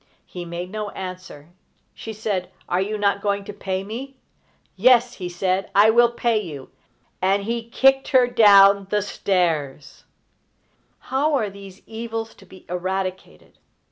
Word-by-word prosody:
He 180 -1 -8
made 175 +2 -6
no 215 -1 -4
answer. 185 -6 -9 0.4
She 225 - -8
said: 205 -4 -3 0.2
"Are 180 +1 0
you 210 +2 -2
not 200 -1 +1
going 200 -1 -1
to 205 - -7
pay 190 -1 -4
me?" 250 +7 -7 0.6
"Yes," 245 +4 +4
he 180 -2 -5
said, 185 +2 -1
"I 210 +2 +6
will 240 +1 +5
pay 235 -2 0
you;" 145 -8 -9 0.5
and 195 +2 +1
he 230 +2 -4
kicked 270 +2 +3
her 260 -3 +4
down 200 -4 +6
the 210 -1 0
stairs. 165 -8 -2 1.1
How 290 +3 +1
are 215 -7 -1
these 195 -1 -13
evils 225 0 -6
to 195 - -19
be 185 0 -16
eradicated? 185 +1 -5
200 Hz, 145 wpm, -22 LUFS, 185-225 Hz, 1.1 s, I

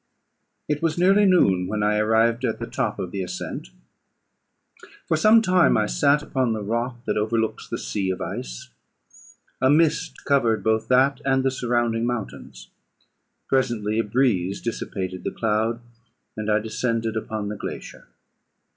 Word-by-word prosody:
It 150 -1 -1
was 165 -1 0
nearly 195 +3 +4
noon 95 - +3
when 105 +1 -2
I 105 0 +2
arrived 115 +3 +2
at - - 0
the - - -5
top - - -2
of 90 - -5
the 100 - -3
ascent. 90 -8 -5 1.4
For 160 - +2
some 215 +7 +5
time 180 - +4
I - - +2
sat 140 - +2
upon 130 -6 0
the 110 -1 -4
rock 115 +4 -2
that - - -1
overlooks 110 +1 -1
the - - -3
sea 95 -2 -3
of 95 - -2
ice. - - -6 0.9
A 130 - +4
mist 155 -1 +1
covered 115 -7 +2
both 110 +1 +1
that 130 +2 +3
and 135 -1 +2
the 135 - +2
surrounding 120 -2 0
mountains. 120 -4 -6 0.8
Presently 115 -5 0
a - - +2
breeze 105 -5 0
dissipated 95 -5 -4
the - - -1
cloud, 110 +1 -1 0.6
and 110 0 -4
I 105 - +4
descended 115 +1 -2
upon 110 -1 -3
the 105 - -4
glacier. - - -8
115 Hz, 155 wpm, -23 LUFS, 105-135 Hz, 1.4 s, some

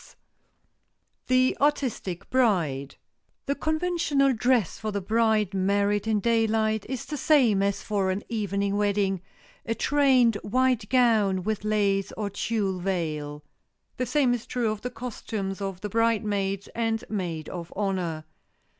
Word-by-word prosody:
[Sidenote: - - -19 1.1
THE 255 0 +3
ARTISTIC 255 - -1
BRIDE] 170 - +1 0.5
The 280 - 0
conventional 315 -3 +1
dress 240 -4 +1
for 215 - -3
the 200 - -1
bride 215 -1 +1
married 200 +2 +1
in 215 -1 +2
daylight 220 -1 +1
is 260 -3 -4
the 300 - -5
same 250 -9 +4
as 200 0 0
for 200 -3 0
an 190 +2 -2
evening 200 -3 -1
wedding, 200 -2 +1 0.4
a 230 - -2
trained 260 -6 +3
white 250 0 0
gown 220 -7 +3
with 215 +1 -2
lace 200 -2 +1
or 205 -2 -4
tulle 200 -2 -1
veil. 155 -5 -3 0.5
The 255 - -1
same 255 -1 +2
is 240 -2 -4
true 235 -3 0
of 215 -1 -5
the 250 - -3
costumes 220 -5 -5
of 195 -2 -4
the 210 - -4
bridesmaids 205 -3 0
and 225 -1 -1
maid 175 -7 -3
of 170 -2 -7
honor. 180 -6 -2
210 Hz, 140 wpm, -26 LUFS, 195-240 Hz, 1.1 s, same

